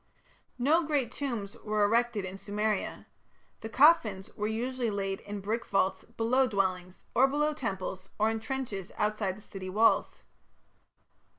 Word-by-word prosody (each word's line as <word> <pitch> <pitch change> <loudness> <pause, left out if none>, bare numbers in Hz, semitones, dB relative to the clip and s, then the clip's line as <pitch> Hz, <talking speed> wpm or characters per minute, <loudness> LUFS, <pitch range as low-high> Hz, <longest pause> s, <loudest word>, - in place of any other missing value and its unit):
No 295 +7 +4
great 290 -6 0
tombs 235 -8 -4
were 210 -1 +1
erected 230 -1 +2
in 190 - -6
Sumeria. 205 +1 -2 0.5
The 220 - -6
coffins 230 - +4
were 210 - -1
usually 240 +2 -1
laid 195 -2 -2
in 205 -1 -6
brick 220 +4 -2
vaults 190 -1 0
below 255 +4 +3
dwellings, 185 -4 -2
or 265 +3 +5
below 295 +2 +1
temples, 190 -8 -4
or 215 - +3
in 225 - -2
trenches 225 -6 -4
outside 210 -2 0
the 210 - -15
city 190 -3 -7
walls. 215 +4 +2
215 Hz, 140 wpm, -30 LUFS, 195-245 Hz, 0.5 s, or